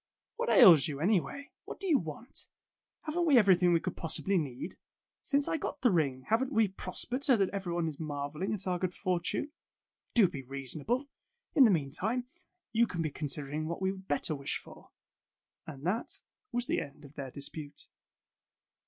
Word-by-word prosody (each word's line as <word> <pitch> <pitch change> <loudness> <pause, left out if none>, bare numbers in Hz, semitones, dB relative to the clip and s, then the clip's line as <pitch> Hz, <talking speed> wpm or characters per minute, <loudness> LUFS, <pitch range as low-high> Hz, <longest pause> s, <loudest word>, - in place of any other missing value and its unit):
What 480 +1 -1
ails 175 - +8
you, 145 -3 -4
anyway? 210 - 0
What - - -8
do 395 - -6
you 320 -7 +4
want? 165 - -5 0.6
Haven't 335 +2 -1
we 285 -5 +6
everything 185 -5 +5
we 170 - +4
could 180 +1 -4
possibly 190 +4 -1
need? 135 -6 -5 0.5
''Since 280 0 +1
I - - 0
got 295 - -5
the 245 - +4
ring, 140 -7 +1
haven't 250 +5 +1
we 220 -5 +3
pros 185 -1 0
pered 255 +3 -3
so 265 -5 +5
that 195 -2 +2
everyone 175 -4 -2
is 150 -2 -5
marveling 150 +3 -3
at 205 -3 +2
our 180 -1 -1
good 180 -1 -2
fortune? 185 - -1 0.6
Do 220 -6 +7
be 140 - -6
reasonable. 140 - -3 0.5
In 275 - +7
the - - +6
meantime, 205 - -2 0.5
you 235 +1 +3
can 170 -5 -3
be 155 - -2
considering 150 +1 -3
what 170 - -4
we 190 0 +1
would 190 0 -10
better 145 +2 0
wish 140 -2 -2
for." - - -14 0.8
And 145 -1 -8
that 210 +7 -2 0.3
was 245 0 0
the - - 0
end 140 +1 -10
of 140 - -14
their 140 -3 -6
dispute. 145 +2 -5
180 Hz, 180 wpm, -31 LUFS, 150-230 Hz, 0.8 s, ails